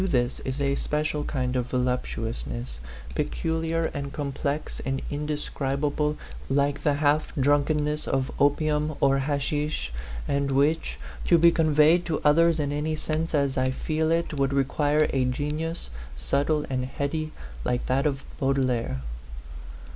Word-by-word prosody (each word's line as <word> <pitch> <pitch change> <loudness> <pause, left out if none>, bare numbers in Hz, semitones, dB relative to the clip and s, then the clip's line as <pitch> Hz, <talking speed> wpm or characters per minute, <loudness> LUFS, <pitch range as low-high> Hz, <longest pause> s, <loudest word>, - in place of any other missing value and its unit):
this 125 -9 +1
is 130 +2 -4
a 140 -1 +2
special 150 +1 -1
kind 130 -3 -1
of 125 -1 0
voluptuousness, 115 - -2 0.3
pe - - +1
culiar 165 0 -1
and 140 -1 -4
complex 140 +1 -3
and 135 0 -2
indescribable, 150 0 -1 0.3
like 140 +1 +1
the 145 -2 +2
half 150 +1 +2
drunkenness 150 +2 +2
of 135 0 0
opium 150 +1 +2
or 135 0 +4
hashish, 145 - -1 0.3
and 140 0 +1
which, 145 +4 +1 0.3
to 170 - +5
be 170 +1 +7
conveyed 155 +1 +4
to 165 -3 -1
others 165 +2 +5
in 145 -1 0
any 150 +2 -1
sense 155 +1 -1
as 140 -2 +1
I 130 0 +2
feel 155 +4 -1
it, 165 0 +1
would 140 -2 +1
require 145 +2 +2
a 135 -1 +2
genius, 150 - -2 0.2
subtle 145 - +1
and 130 -1 -1
heady, 155 +4 -2 0.3
like 125 - 0
that 135 +3 +2
of 140 -2 -2 0.2
Baudelaire. 130 - 0
145 Hz, 140 wpm, -26 LUFS, 135-155 Hz, 0.3 s, be